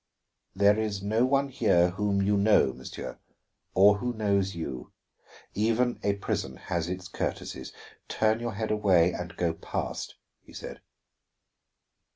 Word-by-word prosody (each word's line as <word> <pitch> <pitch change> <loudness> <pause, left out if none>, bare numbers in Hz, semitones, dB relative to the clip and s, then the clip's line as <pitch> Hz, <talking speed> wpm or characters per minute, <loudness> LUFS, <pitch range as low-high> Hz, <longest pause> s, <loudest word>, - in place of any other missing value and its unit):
"There 100 +2 +4
is 105 -3 -2
no 110 +4 +2
one 140 +1 +2
here 90 -8 +3
whom 100 +1 0
you 100 +1 +2
know, 100 -9 +4
monsieur, 65 +2 -8 0.6
or 100 +2 +6
who 125 +1 -2
knows 100 -3 0
you. 65 -7 -6 0.6
Even 115 +4 +1
a 100 0 +1
prison 65 -9 -3
has 85 -1 -3
its 90 0 -5
courtesies. 65 -6 -4 0.4
Turn 110 +1 +1
your 120 -1 -3
head 110 +1 -2
away, 95 -5 +3
and 85 -1 -6
go 85 -2 +1
past," 80 - -5 0.3
he - - -17
said. - - -8
100 Hz, 140 wpm, -28 LUFS, 90-110 Hz, 0.6 s, or